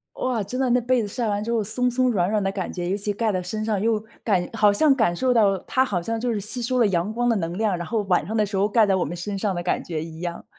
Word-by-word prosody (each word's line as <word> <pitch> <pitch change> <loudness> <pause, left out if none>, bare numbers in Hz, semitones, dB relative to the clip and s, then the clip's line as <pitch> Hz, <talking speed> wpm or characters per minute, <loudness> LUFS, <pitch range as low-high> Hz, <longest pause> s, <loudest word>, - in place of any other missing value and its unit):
哇！ 250 -3 -1
真 255 +6 -4
的 260 -2 +1
那 250 - +3
被 245 0 +1
子 210 - -4
晒 230 +2 -2
完 205 0 -1
之 230 - -4
后， 225 -2 +1
松 250 +4 +1
松 255 +1 +1
软 185 -5 +1
软 215 -1 +1
的 195 - 0
感 190 -2 -4
觉， 175 -1 -4
尤 195 - 0
其 205 0 -2
盖 220 0 0
在 185 -1 -1
身 215 +4 -4
上 215 -3 0
又 220 -1 +1 0.2
感 190 -5 +1
好 210 -2 +4
像 280 +7 +4
感 220 -10 +1
受 255 +6 +1
到， 200 -4 +3
它 260 0 +2
好 195 -8 -2
像 225 +5 -3
就 245 -1 -1
是 210 - -2
吸 235 +5 +1
收 255 +1 0
了 235 - +4
阳 190 +1 0
光 240 +1 0
的 230 - +3
能 170 -1 -3
量， 215 -4 +1
然 175 - -5
后 225 -2 -1
晚 180 -6 +1
上 220 - -3
的 215 -1 +2
时 200 -1 -4
候 200 +2 +2
盖 220 0 +4
在 195 - +2
我 185 - +1
们 170 +5 -5
身 200 +4 -4
上 195 0 -1
的 175 - -3
感 175 - -1
觉 160 -3 -4
一 160 0 -10
样。 175 -1 -5
210 Hz, 345 characters per minute, -23 LUFS, 190-230 Hz, 0.2 s, 好